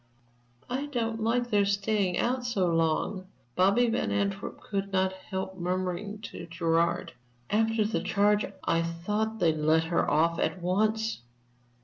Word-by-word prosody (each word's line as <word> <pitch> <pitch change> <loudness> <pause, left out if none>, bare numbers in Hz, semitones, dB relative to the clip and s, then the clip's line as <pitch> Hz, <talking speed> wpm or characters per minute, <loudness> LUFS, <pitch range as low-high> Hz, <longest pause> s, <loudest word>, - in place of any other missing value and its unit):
"I 265 +4 -2
don't 230 -5 -2
like 240 +2 0
their 205 -1 +4
staying 200 -2 +1
out 250 +1 0
so 235 -6 0
long," 165 +4 0 0.3
Bobby 200 +7 +4
Van 235 +1 0
Antwerp 200 -1 -2
could 195 -1 -3
not 190 0 +1
help 190 0 -6
murmuring 185 +3 -2
to - - -8
Gerard. 170 0 0 0.4
"After 225 0 +2
the 220 - -1
charge, 205 +1 +2 0.2
I 165 - +2
thought 210 +7 -2
they'd 165 -6 +2
let 155 +1 +3
her 170 +1 0
off 165 +3 +2
at 185 - 0
once. 215 - 0
200 Hz, 140 wpm, -28 LUFS, 175-220 Hz, 0.4 s, their